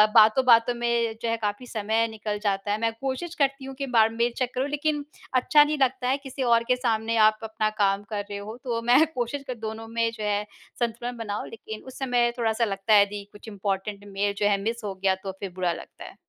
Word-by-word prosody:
बातों-बातों 230 +2 +6
में 235 -1 0
जो 230 - -1
है, 230 - 0
काफ़ी 210 +3 -3
समय 220 +1 0
निकल 215 -1 -4
जाता 200 0 0
है। 210 - +1
मैं 230 - +2
कोशिश 275 +6 -3
करती 275 -2 0
हूँ, 270 - -7
कई 275 - -1
बार 225 -1 +6
मेल 235 +1 +1
चेक 255 -1 -1
करूँ, 260 +3 0
लेकिन 295 0 -1 0.3
अच्छा 295 +4 +6
नहीं 300 +1 -1
लगता 260 -1 +1
है, 270 - +2
किसी 270 -1 -5
और 230 0 +5
के 250 - +4
सामने 230 -2 0
आप 215 0 +1
अपना 220 -1 -1
काम 195 0 +2
कर 205 -2 -2
रहे 200 - -4
हो। 215 +3 -7
तो 235 -2 -2
मैं 245 +7 +5
कोशिश 255 +3 -3
कर 255 - -3
दोनों 220 0 -5
में 230 0 0
जो 220 -2 -7
है, 205 0 0 0.4
संतुलन 240 +1 -2
बनाऊँ, 210 -2 -4
लेकिन 220 -1 -8
उस 260 - -10
समय 245 -2 +2
थोड़ा-सा 230 0 +1
लगता 195 +1 0
है, 205 - +9
यदि 205 0 -5
कुछ 205 +2 -14
इम्पॉर्टेन्ट 200 0 -3
मेल 200 +1 -1
जो 205 - +1
है 200 -1 +3
मिस 230 +3 -2
हो 200 -2 -3
गया, 190 0 +1
तो 190 0 -6
फिर 195 - -4
बुरा 180 -2 0
लगता - - -10
है। - - -11
225 Hz, 230 wpm, -26 LUFS, 205-250 Hz, 0.4 s, है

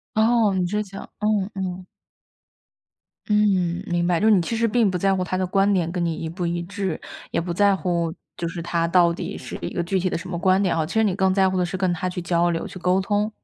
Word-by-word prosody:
哦， 220 -2 +3
你 180 -1 +1
只 210 +3 -1
想 195 -1 -9
嗯 210 -1 0
嗯。 185 -1 -4 1.4
嗯， 190 -4 +2
明 175 -1 0
白， 175 -2 +2
就 215 - +1
是 - - +6
你 190 - +5
其 225 +7 -2
实 230 +1 +2
并 225 -3 +2
不 180 - -2
在 195 +1 +2
乎 185 - -1
他 185 0 -2
的 185 0 0
观 195 +2 +2
点 170 -3 +1
跟 175 -2 -1
你 165 -1 0
一 160 - -5
不 175 +1 -3
一 170 0 -2
致， 190 -2 -4 0.3
也 - - 0
不 175 +1 -3
在 200 +1 +3
乎 170 -3 -1 0.2
就 170 - -3
是 170 0 -5
他 170 0 0
到 170 -1 +4
底 - - -5
是 - - -7
一 - - -4
个 175 - 0
具 190 +1 0
体 185 - 0
的 - - -1
什 170 - -7
么 175 -2 -3
观 185 +2 +3
点 185 -4 +1
啊， 160 -1 +1
其 - - -7
实 220 0 +3
你 195 -4 +1
更 190 -1 +2
在 190 -1 +3
乎 185 - -1
的 180 - +2
是 180 +2 -3
跟 185 -1 +1
他 185 +1 -2
去 180 0 -4
交 175 0 +2
流、 165 - -2
去 185 - -9
沟 180 +2 +2
通。 205 +2 0
185 Hz, 285 characters per minute, -23 LUFS, 175-200 Hz, 1.4 s, 是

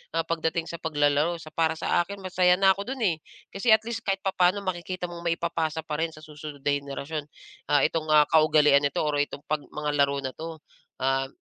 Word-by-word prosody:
ah, 165 - +1
pagdating 165 0 -1
sa 170 -1 -7
paglalaro," 150 +2 +1
so, 155 -1 -12
para 160 0 +1
sa - - +1
akin 200 +4 -6
masaya 180 -1 +3
na 195 0 +5
ako 200 +4 -7
do'n 265 - -9
eh. 170 -4 +2 0.4
Kasi 195 +5 -1
at 220 0 +6
least 230 0 -4
kahit 195 -2 -2
papa'no 190 +1 +2
makikita 180 0 -3
mong 170 -1 -8
maipapasa 165 -2 -1
pa 150 +1 -3
rin 165 - 0
sa 155 -1 -13
susunod 150 -2 -10
na 145 - +3
henerasyon, 140 +2 -4 0.4
ah, 145 -2 +4
itong, 160 0 -1
ah, 150 -1 +6
kaugalian 150 -2 +5
nito 145 +2 0
or 145 -1 0
itong 145 0 -4
pag 155 -1 -1
mga 150 0 -4
laro 140 -1 +2
na 130 - -4
'to, 160 0 -7 0.4
at 135 +1 0
160 Hz, 210 wpm, -26 LUFS, 145-175 Hz, 0.4 s, at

